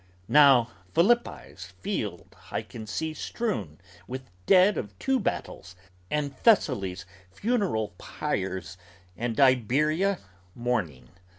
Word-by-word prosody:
Now 135 -5 +7 0.2
Philippi's 240 +7 +1
field 105 - -4
I - - -3
can 110 -2 -9
see 160 +9 -3
strewn 110 - -3 0.3
with 130 -2 -7 0.2
dead 190 +2 +6
of 105 -4 -5
two 265 - +1
battles 95 - -4 0.3
And 145 -2 -2
Thessaly's 100 - +2 0.3
funeral 195 - 0
pyres 95 - -4 0.4
and 115 +1 -3
Iberia 150 - +3 0.4
mourning. 100 - -2
125 Hz, 100 wpm, -27 LUFS, 100-170 Hz, 0.4 s, Now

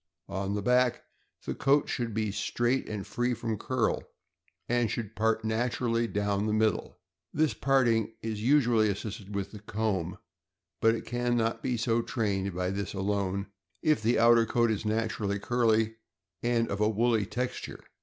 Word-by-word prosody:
On 95 +1 -2
the 105 - -2
back, 125 +1 +3 0.4
the - - -2
coat 140 +1 +2
should 120 -2 -2
be 110 -1 -1
straight 120 +5 0
and 105 -3 -4
free 120 0 -1
from 115 -1 -2
curl, 130 -1 0 0.7
and 120 -2 +1
should 110 -1 -4
part 110 0 +1
naturally 115 +1 0
down 105 -1 0
the 105 - 0
middle. 110 -1 0 0.3
This 155 0 +1
parting 120 -5 +2
is 110 -2 -3
usually 120 -4 +4
assisted 105 0 -5
with 100 -1 -3
the 105 - -9
comb; 100 -4 -2 0.6
but 115 0 +5
it - - -6
can 120 0 0
not 115 0 0
be 125 -2 -1
so 115 +1 +1
trained 100 -6 -1
by 90 0 -1
this 100 0 -4
alone, 100 0 -1 0.3
if 155 -6 +3
the 115 +3 +2
outer 115 0 +5
coat 115 0 +2
is 110 0 -2
naturally 110 -2 -1
curly 110 0 +1 0.4
and 120 -1 +1
of 100 +1 -2
a 105 - +4
woolly 110 -1 +2
texture. 125 +2 -4
110 Hz, 165 wpm, -29 LUFS, 105-120 Hz, 0.7 s, but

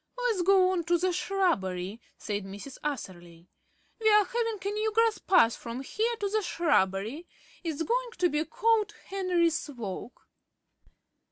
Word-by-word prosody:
"Let's 480 -6 0
go 370 0 +5
on 360 -2 0
to 345 +1 +3
the 365 +1 0
shrubbery," 210 - -1 0.2
said 205 -1 -3
Mrs. 200 +8 -9
Atherley. 175 - -6 0.5
"We 440 -1 +3
are 420 -1 +6
having 460 -1 -1
a 400 - 0
new 430 +1 0
grass 450 0 +2
path 235 -12 +4
from 235 +3 -6
here 455 - -1
to 405 - +1
the 430 +2 0
shrubbery. 280 - 0 0.4
It's 325 -2 -2
going - - 0
to 355 - +3
be 300 -1 0
called 425 +5 +1
Henry's 355 -5 +1
Walk." 235 -3 -7
345 Hz, 150 wpm, -29 LUFS, -, 0.5 s, are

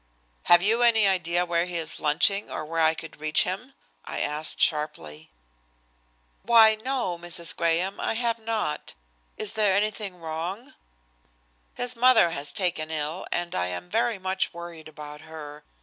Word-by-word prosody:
"Have 175 0 +6
you 225 +4 +3
any 225 -3 +5
idea 175 -2 +1
where 170 0 0
he 175 -1 -4
is 160 -2 0
lunching 180 +7 +1
or 155 - -5
where 165 +2 -3
I 160 0 +3
could 160 -2 -10
reach 155 0 +3
him?" - - -5 0.3
I - - -5
asked 150 +1 -1
sharply. 80 - -1 1.1
"Why! 225 -2 +6
no, 250 -10 -2
Mrs. 170 -1 +2
Graham, 170 +4 0
I - - -1
have 230 0 -1
not. 220 -8 -3 0.4
Is 215 -1 -1
there 210 -3 +3
anything 205 -1 -1
wrong?" 170 - -6 1.0
"His 245 0 -1
mother 230 -7 +5
has 145 -2 -1
been - - -11
taken 160 -3 -1
ill 155 +2 -4
and 175 0 -2
I 90 0 0
am 90 0 -6
very 235 -3 +1
much 190 0 -1
worried 170 -2 -9
about 150 -1 -10
her. 150 -2 -10
170 Hz, 160 wpm, -26 LUFS, 155-210 Hz, 1.1 s, Have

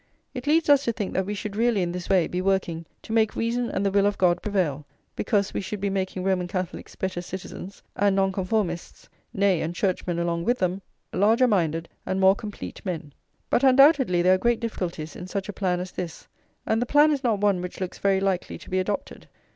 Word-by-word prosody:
It 250 0 -6
leads 320 +2 +3
us 285 -1 +5
to 235 - +2
think 210 -4 -4
that 190 0 0
we 210 - -2
should 200 0 -5
really, 225 -3 +2
in 175 - -2
this 180 0 -6
way, 185 -4 +4
be 180 - -3
working 185 -4 -1 0.2
to 220 - -6
make 220 -1 +2
reason 235 +1 -1
and 200 - -1
the 200 - +2
will 200 0 +3
of 205 - -1
God 175 -1 +3
prevail; 175 -9 -1 0.3
because 205 -3 0
we - - -1
should 205 +2 -5
be 200 0 -1
making 190 -1 -2
Roman 185 -2 +1
Catholics 185 -1 -5
better 190 -2 -3
citizens, 190 +1 -8
and 200 -1 +2
Nonconformists, 190 -2 -1 0.2
nay, 195 -4 +2
and 165 +2 -3
Churchmen 180 -2 -1
along 170 0 -1
with 245 +6 +1
them, 185 0 -1 0.3
larger 225 +6 +4
minded 165 -6 +1 0.2
and 190 - -2
more 190 0 +6
complete 210 0 -8
men. 165 -6 -5 0.4
But 245 - +3
undoubtedly 265 - +5
there 185 +1 +6
are - - +4
great 235 +2 +2
difficulties 175 -9 -4
in 180 - -7
such 195 0 -3
a - - -4
plan 180 -3 0
as 180 +1 -5
this; 170 -3 -6 0.4
and 220 +1 +1
the 245 - -1
plan 295 +3 +5
is 280 -2 -1
not 230 -4 +2
one 200 -3 +2
which 180 0 -6
looks 185 -2 -5
very 195 -1 +2
likely 195 -2 -1
to - - -14
be 185 - +2
adopted. 200 +2 -4
195 Hz, 220 wpm, -25 LUFS, 180-215 Hz, 0.4 s, more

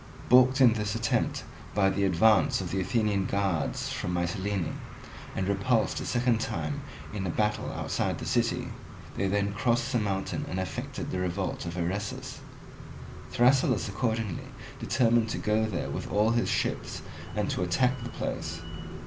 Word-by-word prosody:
Balked 130 +2 +6
in 120 -3 +8
this 105 -1 -2
attempt 115 0 0 0.3
by 95 -2 +4
the 100 +1 +1
advance 95 +3 +4
of 90 -3 -4
the 95 - 0
Athenian 100 0 +1
guards 95 -6 0
from 90 0 -2
Mitylene, 95 0 -1 0.6
and 95 - -1
repulsed 110 +4 +1
a - - -4
second 120 -2 +2
time 75 -9 -2 0.3
in 95 -3 -2
a - - -1
battle 105 +4 0
outside - - -1
the - - -6
city, - - +1 0.5
they 95 - 0
then 100 +1 +1
crossed 120 +1 +1
the 120 - +2
mountain 100 -2 -1
and 90 - -2
effected 95 - -4
the 90 - -1
revolt 90 0 -2
of 85 +1 -5
Eresus. 95 +4 -3 0.9
Thrasyllus 125 -2 +3
accordingly 110 -2 -2 0.3
determined 115 -2 +3
to - - -2
go 110 +1 +1
there 90 -6 -3
with - - -4
all 105 +2 +3
his 120 0 +1
ships - - -1 0.3
and - - 0
to - - -1
attack 125 +8 +2
the 120 - -5
place. - - -4
105 Hz, 155 wpm, -29 LUFS, 95-115 Hz, 0.9 s, in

